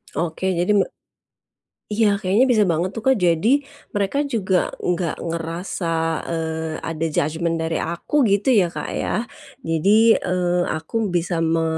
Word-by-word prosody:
Oke, 170 Hz, +2 st, -2 dB
jadi 180 Hz, +4 st, +2 dB
me -, -, +3 dB, 1.1 s
iya, 210 Hz, -2 st, +3 dB
kayaknya 205 Hz, +5 st, +3 dB
bisa 215 Hz, -4 st, +4 dB
banget 170 Hz, +1 st, 0 dB
tuh, 225 Hz, -, -5 dB
Kak. 265 Hz, -, +6 dB
Jadi 175 Hz, +3 st, +2 dB, 0.5 s
mereka 205 Hz, +6 st, 0 dB
juga 195 Hz, -8 st, 0 dB
nggak 175 Hz, -2 st, -1 dB
ngerasa, 165 Hz, +1 st, -3 dB, 0.3 s
eee, 160 Hz, -1 st, -3 dB
ada 165 Hz, 0 st, -2 dB
judgement 165 Hz, +3 st, 0 dB
dari 160 Hz, 0 st, -1 dB
aku, 175 Hz, -, 0 dB
gitu 200 Hz, +3 st, +1 dB
ya, 205 Hz, -8 st, +5 dB
Kak, -, -, -5 dB
ya. 225 Hz, -, -1 dB, 0.4 s
Jadi, 205 Hz, +7 st, +4 dB
eee, 180 Hz, -1 st, 0 dB
aku 160 Hz, +4 st, -5 dB, 0.2 s
bisa 175 Hz, 0 st, 0 dB
me 165 Hz, 0 st, +1 dB
175 Hz, 145 wpm, -21 LUFS, 165-205 Hz, 1.1 s, Kak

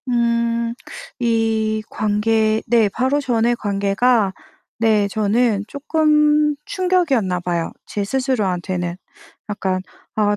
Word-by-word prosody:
음 235 Hz, -1 st, +1 dB, 0.5 s
이 225 Hz, -2 st, 0 dB
관계 215 Hz, +1 st, +1 dB
네 225 Hz, -2 st, +3 dB
바로 260 Hz, +7 st, 0 dB
전에 240 Hz, -3 st, +1 dB
관계가 200 Hz, +1 st, +1 dB, 0.5 s
네 215 Hz, -3 st, +3 dB
저는 215 Hz, +1 st, +1 dB
쪼끔 300 Hz, +1 st, +2 dB
충격이었나봐요 220 Hz, -, 0 dB
제 205 Hz, -, -3 dB
스스로한테는. 190 Hz, -8 st, -1 dB, 0.5 s
약간 190 Hz, -2 st, -1 dB, 0.4 s
아 205 Hz, -1 st, +2 dB
225 Hz, 195 characters per minute, -20 LUFS, 205-250 Hz, 0.5 s, 네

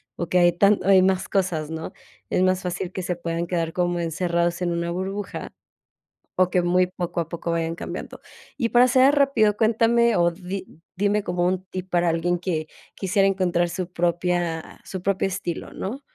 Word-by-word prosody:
o 170 Hz, -, -3 dB
que 180 Hz, -, +3 dB
hay 175 Hz, 0 st, +5 dB
tan 200 Hz, +4 st, +4 dB
o -, -, -4 dB
hay 190 Hz, -1 st, +7 dB
más 190 Hz, 0 st, +1 dB
cosas, 175 Hz, -6 st, 0 dB
¿no? 160 Hz, 0 st, -6 dB, 0.4 s
Es -, -, +2 dB
más 185 Hz, 0 st, +2 dB
fácil 180 Hz, 0 st, -3 dB
que 185 Hz, -, -5 dB
se 180 Hz, 0 st, -2 dB
puedan 170 Hz, 0 st, -3 dB
quedar 165 Hz, -2 st, -2 dB
como 175 Hz, -1 st, 0 dB
encerrados 170 Hz, +1 st, -1 dB
en 175 Hz, -, 0 dB
una 170 Hz, 0 st, -2 dB
burbuja, 190 Hz, +3 st, -4 dB, 0.8 s
o 185 Hz, -1 st, +3 dB
que 180 Hz, -, +2 dB
muy 180 Hz, +1 st, +2 dB
poco 175 Hz, -2 st, -3 dB
a 165 Hz, -, -6 dB
poco 170 Hz, 0 st, -4 dB
vayan 165 Hz, 0 st, -1 dB
cambiando. -, -, -7 dB, 0.4 s
Y 235 Hz, -, +1 dB
para 245 Hz, +2 st, +5 dB
cerrar 260 Hz, +3 st, +5 dB
rápido, 230 Hz, -7 st, +3 dB
cuéntame 230 Hz, +1 st, +3 dB
o 175 Hz, 0 st, +3 dB
di 185 Hz, -1 st, -8 dB, 0.2 s
dime 205 Hz, +1 st, +1 dB
como 175 Hz, -1 st, -1 dB
un 185 Hz, 0 st, -1 dB
tip 185 Hz, 0 st, -6 dB
para 175 Hz, -1 st, +2 dB
alguien, 175 Hz, +2 st, 0 dB
que 165 Hz, -3 st, -2 dB, 0.3 s
quisiera 195 Hz, +1 st, +2 dB
encontrar 175 Hz, -3 st, +1 dB
su 180 Hz, 0 st, -4 dB
propia 175 Hz, -1 st, -1 dB
su 190 Hz, -, -6 dB
propio 195 Hz, +1 st, 0 dB
estilo, 175 Hz, -2 st, -4 dB
¿no? 240 Hz, +9 st, -5 dB
180 Hz, 190 wpm, -24 LUFS, 170-195 Hz, 0.8 s, hay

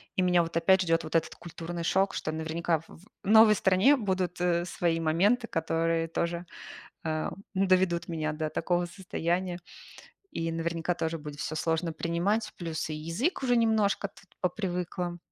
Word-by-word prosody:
и -, -, +2 dB
меня 180 Hz, -1 st, +4 dB
вот 165 Hz, 0 st, -7 dB
опять 190 Hz, +3 st, +4 dB
ждёт 165 Hz, -1 st, +1 dB
вот 160 Hz, +1 st, -6 dB
этот 165 Hz, -, +1 dB
культурный 170 Hz, 0 st, -6 dB
шок, 190 Hz, +3 st, +2 dB
что 155 Hz, -, -2 dB
наверняка 160 Hz, +1 st, -1 dB
в 165 Hz, -, -18 dB
в 165 Hz, -, -19 dB, 0.2 s
новой 220 Hz, 0 st, +8 dB
стране 190 Hz, +10 st, +4 dB
будут, 185 Hz, -5 st, -1 dB
э, 175 Hz, -1 st, +2 dB
свои 170 Hz, -2 st, 0 dB
моменты, 200 Hz, +10 st, +2 dB
которые 165 Hz, -1 st, 0 dB
тоже, 170 Hz, +1 st, -2 dB, 0.6 s
э, 155 Hz, -1 st, -1 dB, 0.2 s
доведут 185 Hz, -3 st, +2 dB
меня 155 Hz, -2 st, -2 dB
до 155 Hz, 0 st, -3 dB
такого 175 Hz, +2 st, 0 dB
состояния. 180 Hz, 0 st, -2 dB, 0.7 s
И 165 Hz, 0 st, -2 dB
наверняка 165 Hz, +1 st, -1 dB
тоже 165 Hz, -1 st, -2 dB
будет 150 Hz, -2 st, -8 dB
всё 155 Hz, -, -3 dB
сложно 165 Hz, +1 st, 0 dB
принимать. 175 Hz, +7 st, -1 dB
Плюс 165 Hz, -2 st, -4 dB
и -, -, -3 dB
язык 170 Hz, -, -2 dB
уже 245 Hz, -2 st, +3 dB
немножко 220 Hz, -3 st, +2 dB
тут 200 Hz, 0 st, -20 dB
попривыкла, 180 Hz, -2 st, -2 dB
170 Hz, 160 wpm, -29 LUFS, 165-190 Hz, 0.7 s, новой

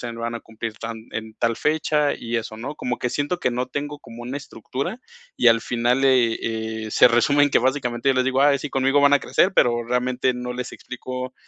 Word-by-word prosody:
sea, 120 Hz, -, -5 dB
se -, -, -10 dB
van 115 Hz, 0 st, -3 dB
a 115 Hz, -, -5 dB
cumplir 115 Hz, 0 st, -6 dB
tan 115 Hz, 0 st, -5 dB, 0.2 s
en 110 Hz, 0 st, -6 dB
tal 115 Hz, -1 st, 0 dB
fecha 150 Hz, -1 st, +1 dB
y 115 Hz, 0 st, -4 dB
eso", 110 Hz, -1 st, -4 dB
¿no?, 135 Hz, +6 st, -6 dB
como 125 Hz, -3 st, -3 dB
que 125 Hz, -, -2 dB
siento 145 Hz, +7 st, -1 dB
que 125 Hz, -, 0 dB
no 125 Hz, +1 st, -2 dB
tengo, 145 Hz, +2 st, -5 dB
como 115 Hz, -2 st, -11 dB
una 125 Hz, +4 st, -4 dB
estructura, 140 Hz, -, -5 dB, 0.4 s
y -, -, +5 dB
al 115 Hz, 0 st, +4 dB
final, 120 Hz, +3 st, 0 dB
eh, 125 Hz, -4 st, +3 dB, 0.5 s
eh, -, -, -6 dB
se -, -, +6 dB
resume 140 Hz, +5 st, +4 dB
en 145 Hz, -, 0 dB
que -, -, +4 dB
básicamente 125 Hz, -1 st, 0 dB
yo 135 Hz, -, +4 dB
les 130 Hz, 0 st, +2 dB
digo: 130 Hz, 0 st, +1 dB
"Ay, 140 Hz, -1 st, +4 dB
sí, 150 Hz, -, -6 dB
conmigo 135 Hz, +2 st, +2 dB
van 140 Hz, 0 st, +5 dB
a 145 Hz, -, +5 dB
crecer", 190 Hz, -, +2 dB
pero 120 Hz, -1 st, +3 dB
realmente 125 Hz, +1 st, 0 dB
no 125 Hz, 0 st, -5 dB
les 125 Hz, 0 st, -5 dB
explico 125 Hz, +1 st, -7 dB
125 Hz, 235 wpm, -23 LUFS, 120-140 Hz, 0.5 s, se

